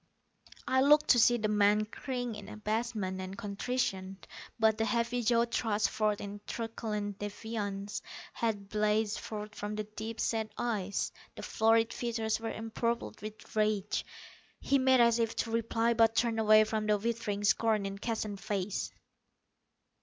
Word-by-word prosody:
I 260 0 +3
looked 300 +2 +5
to 240 - +7
see 240 +2 +5
the 215 -2 0
man 210 0 +3
cringe 245 +1 -4
in 210 -1 -9
abasement 215 -3 -2
and 190 +1 -6
contrition. 200 -3 -2 0.4
But 220 -1 +3
the 225 - +2
heavy 235 +2 0
jaw 235 +1 +3
thrust 220 -3 0
forth 210 -1 +1
in 205 0 -7
truculent 210 -3 -4
defiance; 205 -1 -4 0.3
hate 210 -4 -2
blazed 215 +1 +1
forth 210 -1 -6
from 210 0 -4
the 215 - -2
deep 220 +2 -7
set 220 -1 -1
eyes; 205 -5 -1 0.2
the - - -8
florid 225 +1 +3
features 225 -2 -1
were 225 0 -3
empurpled 225 +1 -3
with 215 +1 -9
rage. 210 -2 +1 0.6
He 275 0 +2
made 260 -1 +5
as 235 0 +4
if 230 -1 0
to 225 - -2
reply, 230 +1 +1
but 225 -1 +4
turned 230 -1 +1
away 215 0 +7
from 215 0 -2
the 210 -1 +4
withering 215 -2 -2
scorn 215 0 +2
in 195 0 -5
Keston's 215 -3 -3
face. 200 -1 -2
220 Hz, 155 wpm, -31 LUFS, 210-230 Hz, 0.6 s, to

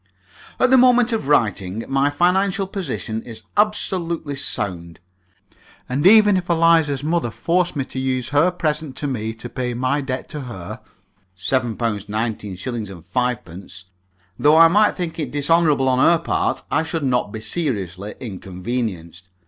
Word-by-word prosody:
At 255 - +3
the 265 - +7
moment 245 -1 +5
of 220 -11 -2
writing 110 -6 +1
my 135 +1 +2
financial 190 +5 +1
position 135 - -4
is 110 -2 -10
absolutely 175 -7 0
sound, 90 -10 -4 0.9
and 140 +7 +2
even 210 -1 +7
if 180 -1 -4
Eliza's 165 -4 +3
mother 160 -5 0
forced 175 +9 0
me 140 -2 -2
to 130 - -6
use 130 -1 -1
her 145 +5 +3
present 155 -5 -3
to - - -4
me 110 -5 -2
to 110 - -8
pay 125 -2 -4
my 130 +4 0
debt 130 -1 -4
to 150 - -6
her 105 -9 -8 0.6
(£7 120 +3 -1
19_s._ 105 -2 -3 0.4
5_d._), 95 -2 -4 0.6
though 150 +2 +5
I 165 0 +9
might 210 +4 +4
think 170 -2 -5
it 150 -5 -2
dishonourable 145 0 +2
on 130 -1 +2
her 170 +5 +5
part, 165 - -1
I - - +2
should 160 -1 -3
not 125 -5 0
be 110 - -6
seriously 105 - -3
inconvenienced. 95 -4 -5
135 Hz, 150 wpm, -21 LUFS, 110-165 Hz, 0.9 s, I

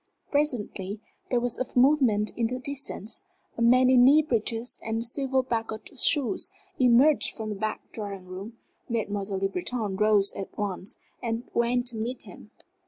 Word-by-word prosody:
Presently 220 -8 -1 0.3
there 245 - +2
was 245 -1 -3
a 255 -1 0
movement 245 -6 +4
in 230 -1 +1
the 250 +2 -3
distance. 270 - -4 0.3
A - - -5
man 250 +2 +5
in 255 -1 +6
knee 290 +5 +7
breeches 230 -2 -2
and 225 +1 -2
silver 265 +1 0
buckled 225 -3 -3
shoes 285 -6 +3 0.3
emerged 255 +4 +4
from 220 -2 -5
the 210 - -3
back 215 +2 -3
drawing 200 -4 -6
room. 195 +5 -8 0.3
Mademoiselle 205 -3 -2
Le 195 +1 +1
Breton 200 +2 -2
rose 210 -1 +3
at 195 - -7
once 195 -1 -4 0.2
and 230 -1 -2
went 245 +1 +1
to 240 -3 -4
meet 240 +4 -4
him. - - -13
230 Hz, 160 wpm, -27 LUFS, 210-255 Hz, 0.3 s, knee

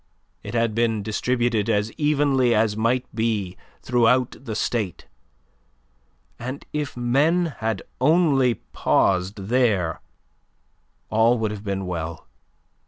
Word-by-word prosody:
It 105 +3 -7
had 115 -1 +1
been 115 -2 0
distributed 115 0 0
as 105 0 +1
evenly 140 -5 +2
as 105 -1 +2
might 120 +3 +1
be 110 -5 -1 0.3
throughout 125 +1 +2
the 110 -5 -5
State, 105 -5 -2 1.3
and 130 +4 -6
if 150 -3 -3
men 150 +7 +2
had 110 -4 -2 0.2
only 135 -4 +3
paused 90 - 0
there, 110 -9 +1 1.1
all 115 +3 +4
would 110 -2 -1
have 105 -1 -7
been 100 -2 -3
well. 85 -2 -5
115 Hz, 110 wpm, -23 LUFS, 105-130 Hz, 1.3 s, all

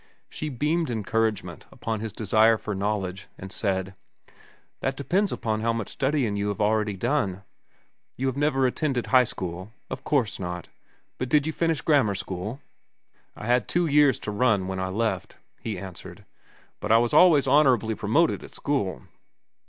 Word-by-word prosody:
She 155 - -4
beamed 150 +5 0
encouragement 110 -1 -2
upon 110 -1 -4
his 110 0 -4
desire 110 +2 +3
for 105 - -5
knowledge, 100 -1 -2
and 95 0 -9
said: 95 0 -2 0.9
"That 135 0 -2
depends 190 +8 +1
upon 110 -2 -2
how 115 +1 +1
much 115 -2 -3
studying 135 -6 0
you 100 0 -1
have 100 -2 -3
already 105 -1 +1
done. 105 -5 -1 0.7
You 135 - -2
have 130 -1 0
never 140 -2 +2
attended 130 -1 0
high 130 -1 +5
school? 95 0 -6 0.2
Of - - -5
course 130 -9 0
not. 90 -2 -5 0.5
But 130 - -2
did 150 0 +3
you 160 - -2
finish 165 -4 0
grammar 135 -10 +3
school?" 100 +7 -5 0.7
"I - - -8
had 125 +1 +2
two 175 0 +1
years 145 -4 +4
to 105 - -4
run, 105 -3 +2
when 95 0 -3
I 95 - -1
left," 105 -1 -2 0.2
he 110 -4 -4
answered. 95 -1 -10 0.5
"But - - -2
I 115 - +7
was 120 0 +1
always 160 -7 +6
honorably 130 -6 +4
promoted 130 +11 +1
at - - -12
school." 135 -10 -2
115 Hz, 165 wpm, -26 LUFS, 100-140 Hz, 0.9 s, I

